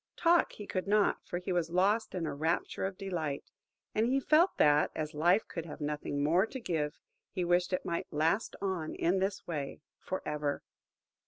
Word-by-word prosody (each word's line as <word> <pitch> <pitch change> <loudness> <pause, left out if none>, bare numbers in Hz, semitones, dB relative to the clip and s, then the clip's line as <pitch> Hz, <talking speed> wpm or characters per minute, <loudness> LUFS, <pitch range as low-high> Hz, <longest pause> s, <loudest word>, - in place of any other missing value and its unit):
Talk 340 0 +4
he 210 - -8
could 185 -1 -3
not, 210 0 +3
for 175 - -2
he 180 +1 -4
was 170 -2 0
lost 200 +5 +2
in 175 -3 -1
a - - -2
rapture 160 +5 -1
of 190 -1 -7
delight; 170 -8 -3 0.5
and 220 +2 +2
he 265 +2 +2
felt 320 +7 +4
that, 150 0 +5
as 155 0 -3
life 175 +7 +3
could 165 -1 -5
have - - -8
nothing 145 -1 -2
more 175 +8 +3
to 260 - -6
give 160 -8 -2 0.3
he 180 -2 -2
wished 175 +1 +2
it 185 - -1
might 170 - -2
last 160 +8 +1
on 185 -5 -2
in 185 +3 +2
this 195 +1 -1
way 150 -5 -4 0.2
for 185 - -4
ever. 150 -1 -2
175 Hz, 190 wpm, -32 LUFS, 155-195 Hz, 0.5 s, that